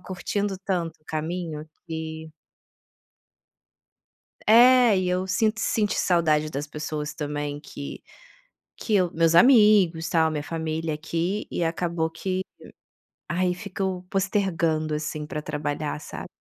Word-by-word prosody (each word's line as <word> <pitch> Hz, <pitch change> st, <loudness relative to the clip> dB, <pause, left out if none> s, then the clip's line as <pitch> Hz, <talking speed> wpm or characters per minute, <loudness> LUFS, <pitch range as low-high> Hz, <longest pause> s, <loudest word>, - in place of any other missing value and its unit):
curtindo 195 Hz, +2 st, -3 dB
tanto 175 Hz, -4 st, -2 dB
o 155 Hz, -, -35 dB
caminho 160 Hz, 0 st, -4 dB, 0.2 s
que 160 Hz, 0 st, -6 dB, 2.1 s
É. 240 Hz, 0 st, +7 dB
E 185 Hz, -, 0 dB
eu 180 Hz, +1 st, 0 dB
sint 215 Hz, +4 st, +1 dB
senti 215 Hz, -1 st, 0 dB
saudade 155 Hz, -4 st, +2 dB
das 145 Hz, +1 st, -4 dB
pessoas, 150 Hz, 0 st, -5 dB
também, 145 Hz, -1 st, -4 dB
que 140 Hz, -1 st, -8 dB, 0.7 s
que 220 Hz, -, -2 dB
eu 180 Hz, -3 st, +2 dB
meus 165 Hz, 0 st, +2 dB
amigos, 200 Hz, -7 st, +6 dB
tal, 160 Hz, -1 st, +3 dB
minha 150 Hz, -2 st, -3 dB
família 160 Hz, 0 st, -3 dB
aqui 170 Hz, +6 st, -2 dB
e -, -, -2 dB
acabou 165 Hz, 0 st, -1 dB
que 185 Hz, +3 st, -3 dB, 0.9 s
ai, 180 Hz, +1 st, 0 dB
fico 190 Hz, -1 st, -4 dB
postergando, 170 Hz, -6 st, 0 dB
assim, 150 Hz, 0 st, -4 dB
para 150 Hz, -, -4 dB
trabalhar, 150 Hz, 0 st, -3 dB
sabe. -, -, -8 dB
165 Hz, 120 wpm, -25 LUFS, 155-190 Hz, 2.1 s, É